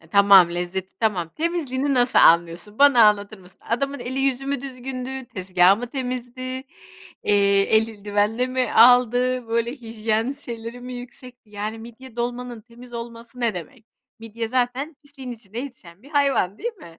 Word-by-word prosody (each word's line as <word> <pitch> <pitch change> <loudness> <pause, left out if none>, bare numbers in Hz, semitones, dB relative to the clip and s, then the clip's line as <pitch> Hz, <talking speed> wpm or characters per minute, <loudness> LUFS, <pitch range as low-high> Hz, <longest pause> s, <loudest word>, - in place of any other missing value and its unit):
e, 160 - -20
tamam, 200 -2 +6
lezzeti, 180 +2 -4
tamam. 190 -7 0
Temizliğini 290 -5 -1
nasıl 245 0 +3
anlıyorsun 170 +6 +3
bana 280 -5 +6
anlatır 210 0 +2
mısın? 185 0 -19
Adamın 275 +4 -2
eli 260 +2 -3
yüzü 270 0 0
mü 280 -2 -2
düzgündü, 260 0 -6
tezgâhı 185 -3 +3
mı 245 +3 -5
temizdi, 250 -1 -5 0.8
eee, 200 -1 +4
eldivenle 220 +2 0
mi 255 0 -1
aldı, 245 +1 +4
böyle 230 +1 0
hijyen 225 -1 -2
şeyleri 235 -2 -8
mi 250 +1 -7
yüksekti, 245 -1 -12
yani 210 +2 -5
midye 235 +2 -12
dolmanın 240 -1 -4
temiz 240 +2 -16
olması 235 +1 -9
ne 235 -2 +1
demek? 225 +7 -9 0.3
Midye 225 0 -6
zaten 255 +5 -1
pisliğin 280 -3 -10
içinde 225 -1 -10
yetişen 230 -8 -9
bir 280 - -16
hayvan, 275 - +1
değil 470 +3 -4
mi? 170 - -15
235 Hz, 150 wpm, -23 LUFS, 210-255 Hz, 0.8 s, tamam